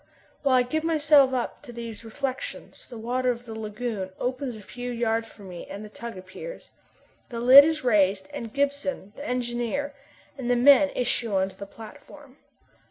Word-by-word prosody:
While 275 Hz, -2 st, +3 dB
I 250 Hz, -, +5 dB
give 310 Hz, +6 st, -2 dB
myself 300 Hz, -4 st, +5 dB
up 255 Hz, -2 st, -3 dB
to 285 Hz, -5 st, -11 dB
these 230 Hz, -2 st, -8 dB
reflections 260 Hz, +3 st, -5 dB
the 240 Hz, -, -9 dB
water 250 Hz, +3 st, -1 dB
of 240 Hz, 0 st, -2 dB
the 225 Hz, -, -7 dB
lagoon 215 Hz, -2 st, -4 dB
opens 255 Hz, 0 st, -2 dB
a 215 Hz, -, -11 dB
few 245 Hz, +4 st, -7 dB
yards 230 Hz, -1 st, 0 dB
from 205 Hz, -3 st, -14 dB
me 175 Hz, -2 st, -8 dB
and 205 Hz, +2 st, -7 dB
the -, -, -10 dB
tug 230 Hz, 0 st, -8 dB
appears. 190 Hz, -, -9 dB, 0.6 s
The 235 Hz, -3 st, -5 dB
lid 255 Hz, +4 st, +10 dB
is 315 Hz, -1 st, 0 dB
raised 200 Hz, -5 st, +3 dB
and 235 Hz, -6 st, -6 dB
Gibson, 280 Hz, -6 st, -2 dB
the 285 Hz, -, -8 dB
engineer, 250 Hz, +3 st, -2 dB, 0.5 s
and 245 Hz, -2 st, -3 dB
the 245 Hz, -, +4 dB
men 285 Hz, +3 st, +6 dB
issue 240 Hz, -3 st, -1 dB
on 190 Hz, 0 st, +2 dB
to 190 Hz, -, -16 dB
the 200 Hz, +1 st, -8 dB
platform. 260 Hz, +6 st, -13 dB
245 Hz, 180 wpm, -26 LUFS, 220-275 Hz, 0.6 s, lid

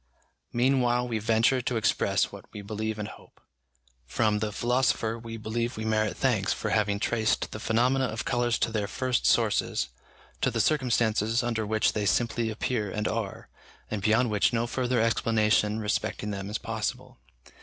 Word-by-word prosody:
Meanwhile, 125 Hz, -1 st, +2 dB
we 115 Hz, -2 st, -1 dB
venture 115 Hz, +4 st, +2 dB
to 120 Hz, 0 st, -1 dB
express 110 Hz, -, +1 dB
what -, -, -12 dB
we 105 Hz, -, -8 dB
believe 110 Hz, +1 st, -3 dB
and 105 Hz, -1 st, -4 dB
hope. -, -, -14 dB, 0.7 s
From 105 Hz, -, +1 dB
the 105 Hz, 0 st, -2 dB
philosopher 120 Hz, 0 st, +1 dB
we 115 Hz, 0 st, -7 dB
believe 115 Hz, +2 st, -3 dB
we 110 Hz, -, -4 dB
merit 110 Hz, -3 st, 0 dB
thanks -, -, +1 dB
for -, -, -3 dB
having 105 Hz, -1 st, +1 dB
traced 110 Hz, 0 st, 0 dB
the 110 Hz, -, -6 dB
phenomena 125 Hz, +4 st, +2 dB
of 110 Hz, -2 st, -4 dB
colours 120 Hz, -1 st, +1 dB
to -, -, +1 dB
their 105 Hz, -2 st, -1 dB
first 130 Hz, +1 st, 0 dB
sources, -, -, +2 dB, 0.5 s
to -, -, +3 dB
the -, -, -2 dB
circumstances 115 Hz, -5 st, +2 dB
under 115 Hz, -3 st, -1 dB
which 110 Hz, 0 st, +2 dB
they 105 Hz, -2 st, -1 dB
simply 115 Hz, +2 st, +1 dB
appear 110 Hz, -1 st, -2 dB
and 105 Hz, +2 st, -2 dB
are, 110 Hz, -3 st, -3 dB, 0.4 s
and 105 Hz, -2 st, -2 dB
beyond 110 Hz, +3 st, +2 dB
which 105 Hz, +3 st, +3 dB
no 120 Hz, -1 st, 0 dB
further 125 Hz, 0 st, 0 dB
explanation 110 Hz, -2 st, +2 dB
respecting 105 Hz, 0 st, -2 dB
them 100 Hz, 0 st, -5 dB
is 105 Hz, -, -2 dB
possible. -, -, -4 dB
110 Hz, 165 wpm, -27 LUFS, 105-120 Hz, 0.7 s, to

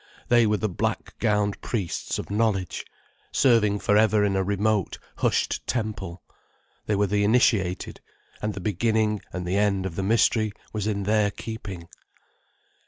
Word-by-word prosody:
They 120 Hz, -2 st, +5 dB
were 105 Hz, 0 st, +2 dB
the 110 Hz, -, -1 dB
black 90 Hz, -, -2 dB
gowned 105 Hz, -2 st, +1 dB
priests 100 Hz, -8 st, -3 dB
of -, -, -6 dB
knowledge, 105 Hz, -4 st, 0 dB, 0.4 s
serving 105 Hz, -5 st, +3 dB
for 105 Hz, -, +3 dB
ever 110 Hz, -1 st, +4 dB
in 100 Hz, -1 st, 0 dB
a 95 Hz, -, +1 dB
remote, 100 Hz, +1 st, 0 dB, 0.2 s
hushed -, -, 0 dB
temple. 100 Hz, -7 st, -3 dB, 0.6 s
They 105 Hz, -, +2 dB
were 100 Hz, +1 st, +2 dB
the 100 Hz, +1 st, +1 dB
initiated, 105 Hz, -4 st, +2 dB, 0.4 s
and 105 Hz, -1 st, -2 dB
the 95 Hz, -, -6 dB
beginning 105 Hz, +2 st, +1 dB
and 90 Hz, -1 st, -4 dB
the 90 Hz, +3 st, 0 dB
end 100 Hz, -2 st, +1 dB
of 90 Hz, -3 st, -4 dB
the 95 Hz, -, -2 dB
mystery 110 Hz, +1 st, +2 dB, 0.2 s
was 105 Hz, -1 st, -2 dB
in 100 Hz, -2 st, -1 dB
their 105 Hz, +1 st, +2 dB
keeping. 100 Hz, -6 st, -7 dB
105 Hz, 155 wpm, -25 LUFS, 95-110 Hz, 0.6 s, They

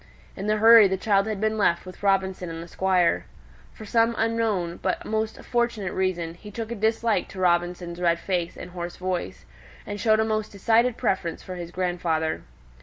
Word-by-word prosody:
In 195 Hz, -, -5 dB
the 215 Hz, 0 st, +2 dB
hurry, 225 Hz, -1 st, +8 dB
the 190 Hz, 0 st, -1 dB
child 200 Hz, +1 st, +2 dB
had 215 Hz, -3 st, -3 dB
been 215 Hz, +1 st, 0 dB
left 170 Hz, -3 st, +2 dB
with 185 Hz, -1 st, -11 dB
Robinson 190 Hz, -2 st, 0 dB
and 165 Hz, 0 st, -6 dB
the -, -, -11 dB
Squire. 185 Hz, -1 st, +1 dB, 0.5 s
For 215 Hz, -, -11 dB
some 230 Hz, +2 st, +2 dB
unknown, 220 Hz, -7 st, 0 dB
but 185 Hz, -, -1 dB
most 220 Hz, 0 st, -2 dB
fortunate 235 Hz, -6 st, -1 dB
reason, 175 Hz, -3 st, -1 dB
he 210 Hz, +5 st, -12 dB
took 225 Hz, +2 st, -6 dB
a -, -, -2 dB
dislike 220 Hz, +1 st, +1 dB
to 190 Hz, -, -9 dB
Robinson's 175 Hz, -1 st, 0 dB
red 170 Hz, -1 st, +3 dB
face 175 Hz, -3 st, -2 dB
and 180 Hz, -, -8 dB
hoarse 175 Hz, -1 st, -6 dB
voice, 185 Hz, -1 st, -4 dB, 0.4 s
and 205 Hz, 0 st, -5 dB
showed 220 Hz, 0 st, +4 dB
a 220 Hz, -, +3 dB
most 215 Hz, -1 st, -2 dB
decided 230 Hz, +4 st, +2 dB
preference 190 Hz, -7 st, -1 dB
for 185 Hz, -, -7 dB
his 175 Hz, -2 st, -6 dB
grandfather. 175 Hz, -3 st, -1 dB
190 Hz, 185 wpm, -25 LUFS, 175-220 Hz, 0.5 s, hurry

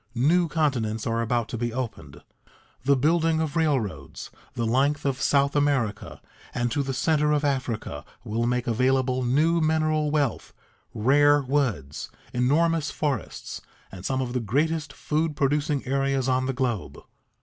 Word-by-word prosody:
New 165 Hz, +8 st, +3 dB
continents 125 Hz, -9 st, -1 dB
are 115 Hz, 0 st, 0 dB
about 115 Hz, 0 st, 0 dB
to 115 Hz, -, -5 dB
be 120 Hz, 0 st, -1 dB
opened. 115 Hz, -, -6 dB, 0.6 s
The 140 Hz, +1 st, +5 dB
building 160 Hz, +3 st, +2 dB
of 155 Hz, -3 st, -2 dB
railroads 120 Hz, -, -1 dB, 0.2 s
the 120 Hz, -2 st, -1 dB
length 140 Hz, +6 st, +1 dB
of 135 Hz, -1 st, -1 dB
South 140 Hz, 0 st, +2 dB
America 140 Hz, -8 st, 0 dB, 0.3 s
and 120 Hz, 0 st, 0 dB
to 145 Hz, -, 0 dB
the 135 Hz, -1 st, -3 dB
center 150 Hz, +2 st, +2 dB
of 150 Hz, 0 st, +1 dB
Africa 130 Hz, -5 st, -2 dB, 0.2 s
will 115 Hz, +2 st, -1 dB
make 125 Hz, 0 st, 0 dB
available 130 Hz, +2 st, +1 dB
new 155 Hz, +7 st, +2 dB
mineral 155 Hz, -1 st, +1 dB
wealth, 145 Hz, -4 st, -1 dB, 0.4 s
rare 145 Hz, +5 st, +4 dB
woods, 125 Hz, -, -1 dB, 0.2 s
enormous 150 Hz, +5 st, +2 dB
forests, 140 Hz, -, -3 dB, 0.3 s
and 95 Hz, -2 st, -10 dB
some 130 Hz, +4 st, 0 dB
of 120 Hz, -1 st, -5 dB
the 125 Hz, -, 0 dB
greatest 145 Hz, +7 st, 0 dB
food 155 Hz, +1 st, -1 dB
producing 145 Hz, 0 st, 0 dB
areas 135 Hz, 0 st, 0 dB
on 130 Hz, 0 st, +1 dB
the 135 Hz, -, -1 dB
globe. 125 Hz, -6 st, -2 dB
135 Hz, 150 wpm, -25 LUFS, 120-150 Hz, 0.6 s, The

